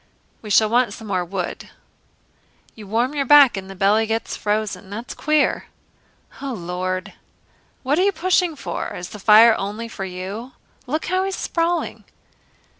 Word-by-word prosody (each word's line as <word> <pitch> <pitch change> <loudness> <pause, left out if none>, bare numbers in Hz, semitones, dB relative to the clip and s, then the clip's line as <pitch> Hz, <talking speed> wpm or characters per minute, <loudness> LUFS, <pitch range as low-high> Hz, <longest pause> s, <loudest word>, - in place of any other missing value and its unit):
"We 215 - -9
shall 215 +1 +5
want 240 +3 +1
some 220 -2 -10
more 185 -2 0
wood." 180 0 -5 1.0
"You 215 -2 -12
warm 235 +6 0
your 285 -2 0
back 280 -3 +7
and 190 -1 -6
your 195 - -9
belly 205 +4 +2
gets 225 +1 -2
frozen. 210 -2 -2
That's 225 +4 -6
queer." 305 -1 +1 0.7
"O 275 -2 -4
Lord!" 185 -1 -4 0.7
"What 285 +5 +1
are - - +4
you 400 - +3
pushing 365 -3 +1
for? - - -5
Is 175 0 -7
the 210 - -10
fire 220 +3 +7
only 210 +4 -4
for 220 -3 -7
you? 190 +7 -7 0.3
Look 310 +5 -2
how 370 +2 0
he's 385 0 -2
sprawling!" 340 0 -2
225 Hz, 160 wpm, -21 LUFS, 195-285 Hz, 1.0 s, back